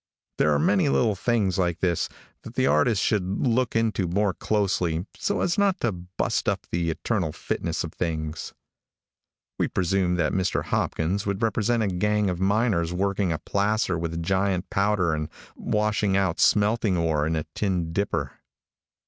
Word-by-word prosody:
There 75 - +4
are 75 - +3
many 70 - +2
little 70 +11 +2
things 100 -3 0
like 85 -2 +1
this 85 -2 0 0.3
that - - -11
the - - +2
artist 90 +8 +3
should 100 +1 0
look 125 0 +1
into 110 -5 +1
more 100 +3 +1
closely 90 -5 0
so 200 - -1
as 170 - +1
not 200 -2 +2
to 120 - +1
bust 90 0 -2
up - - -2
the 85 -1 0
eternal 90 0 -1
fitness - - -3
of - - -6
things. 80 -2 -3 1.1
We - - +2
presume 90 0 +1
that 85 -3 0
Mr 95 -1 0
Hopkins 95 +6 -1
would 100 +3 -1
represent 115 +1 +1
a - - +1
gang 105 +2 +1
of 90 - -4
miners 95 -3 +1
working 100 0 0
a 80 - 0
placer 100 +1 0
with 85 0 -3
giant 95 0 0
powder 100 -4 +2
and 75 0 -3 0.3
washing 105 -2 0
out 95 -3 0
smelting 105 -2 +3
ore 80 -3 +1
in 80 - 0
a 80 - -1
tin 90 -5 -1
dipper. 100 +3 -2
95 Hz, 165 wpm, -25 LUFS, 85-105 Hz, 1.1 s, There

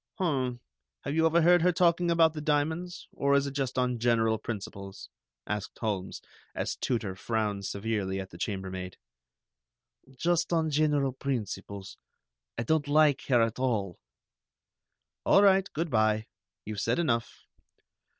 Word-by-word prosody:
"Hum, 130 - -1 0.4
have 140 - -4
you 160 +1 +4
overheard 170 +2 +5
her 180 +2 +4
talking 175 0 +2
about 165 -2 +4
the 155 - -5
diamonds, 160 +4 -1
or 140 0 +1
is 140 0 +3
it 140 - -3
just 135 -2 -3
on 125 -1 0
general 115 -2 +2
principles?" 100 -3 -7 0.3
asked 105 -1 -4
Holmes, 100 -5 -3 0.3
as - - -2
Tooter 110 -6 -2
frowned 105 -1 -2
severely 100 -2 -2
at 95 0 -7
the 85 - -12
chambermaid. 95 -2 -4 1.2
"Just 175 +3 +1
on 160 -2 +1
general 145 -3 +2
principles. 105 -7 -5 0.6
I 115 - -1
don't 150 +3 +1
like 150 -1 +3
her 120 -4 +4
at 115 +1 -2
all." 105 -9 -1 1.2
"All 200 - +5
right. 195 -1 +4
Good 165 +1 -3
by. 110 -1 +2 0.4
You've 105 -1 -4
said - - +1
enough. 120 -9 -1
130 Hz, 140 wpm, -29 LUFS, 105-160 Hz, 1.2 s, overheard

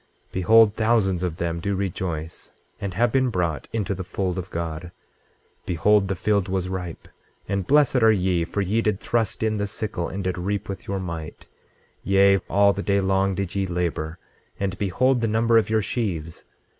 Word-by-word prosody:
26:4 - - -37
Behold, 110 +3 +5
thousands 110 -5 +1
of 90 -3 -2
them 85 0 -2
do 100 +3 -1
rejoice, 85 -4 -4 0.3
and 95 -3 -4
have 120 +2 +2
been 130 0 +2
brought 85 -8 -2
into 105 -3 -1
the 95 0 -5
fold 95 0 -2
of 90 - -7
God. 85 0 -4
26:5 85 - -11 0.8
Behold, 95 +4 +3
the 95 - -1
field 100 0 0
was 95 -1 -1
ripe, 90 -3 -6 0.4
and 100 -2 -2
blessed 145 -2 +4
are 110 0 +6
ye, 90 -4 +1
for 95 +4 -2
ye 105 +4 +1
did 105 -3 0
thrust 115 -3 -1
in 110 -1 +1
the 105 0 -1
sickle, 100 -4 -3
and 95 +1 -4
did 90 -1 -2
reap 100 +3 -2
with 95 -2 -7
your 100 0 -2
might, 85 -4 -6 0.6
yea, 100 0 +4
all 100 +1 +4
the 100 - -4
day 100 0 +1
long 95 0 +1
did 95 -2 -3
ye 100 -1 -1
labor; 85 -2 -2 0.4
and 95 -2 -1
behold 125 +6 +2
the 115 - +1
number 115 +1 +4
of 110 - -2
your 110 -1 +2
sheaves! 85 -9 -3
95 Hz, 195 wpm, -24 LUFS, 90-105 Hz, 0.8 s, are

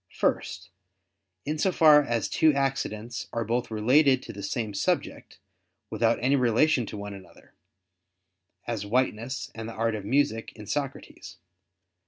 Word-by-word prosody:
First, 95 0 -1 0.7
in 150 +1 -2
so 190 - +2
far 155 -4 +7
as 120 -6 -1
two 155 -2 +3
accidents 120 -4 -2
are 115 -1 -2
both 120 +3 -1
related 130 +5 +3
to - - -8
the 100 - -8
same 110 +1 -3
subject, 100 - -2 0.5
without 115 0 +2
any 135 +2 +3
relation 125 0 +2
to 105 - -7
one 100 0 -6
another; 95 -2 -15 1.1
as 115 -4 -3
whiteness 120 +3 -1
and 115 0 -6
the - - -7
art 115 0 0
of 105 -2 -4
music 115 -1 0
in 105 - -10
Socrates. 140 +3 -5
115 Hz, 145 wpm, -27 LUFS, 110-135 Hz, 1.1 s, far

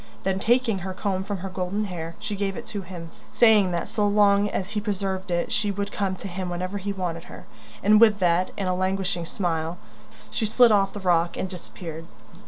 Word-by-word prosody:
Then, 190 0 0
taking 230 -1 +2
her 185 +1 -5
comb 190 -1 -1
from 200 0 -3
her - - -3
golden 190 +3 -2
hair, 170 -3 -6
she 210 - -4
gave 195 -1 -2
it 235 - -6
to 205 - -2
him, 170 -3 -9 0.2
saying 215 -5 +5
that 170 - -2
so 210 -1 +1
long 205 0 +4
as 190 0 -3
he 210 - -1
preserved 195 -2 -2
it 175 -1 -1
she 210 -1 +1
would 200 +1 -2
come 195 -2 -1
to 195 - -7
him 185 0 -4
whenever 185 +3 -3
he 200 +1 -3
wanted 175 -4 -4
her; 180 - -11 0.4
and 210 +2 +6
with 215 -3 +7
that, 180 -1 +2
and 195 - -1
a 185 - +1
languishing 185 -1 -1
smile, 165 -2 -2 0.5
she 220 - 0
slid 235 +2 +6
off 195 -2 +3
the 205 - -5
rock 175 -2 +2
and - - -2
disappeared. 165 -3 -8
190 Hz, 210 wpm, -25 LUFS, 180-205 Hz, 0.5 s, with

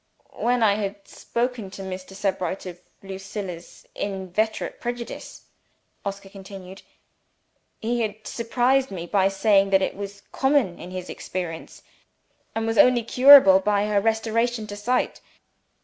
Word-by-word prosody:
"When 245 0 +2
I 205 -2 +5
had 200 -1 -5
spoken 235 -4 -3
to 195 +1 -9
Mr. 190 0 -7
Sebright 190 -2 -2
of 180 -1 -8 0.2
Lucilla's 190 -2 -7
inveterate 200 +2 -3
prejudice," 240 -1 -6 0.6
Oscar 200 0 -5
continued, 195 -1 -11 1.0
"he 235 +2 -1
had 215 -1 -4
surprised 250 +3 +1
me 175 -3 -6
by 195 +2 +2
saying 195 0 +3
that 190 0 +4
it - - -2
was 200 0 -8
common 265 -10 +1
in 180 - -8
his 185 -1 -6
experience, 175 -3 -6 0.7
and 225 0 -1
was 225 0 0
only 250 -2 +6
curable 250 -5 +8
by 205 +1 +1
her 210 -1 +1
restoration 225 +1 0
to 205 -1 -7
sight. 245 +5 -1
200 Hz, 135 wpm, -24 LUFS, 190-230 Hz, 1.0 s, curable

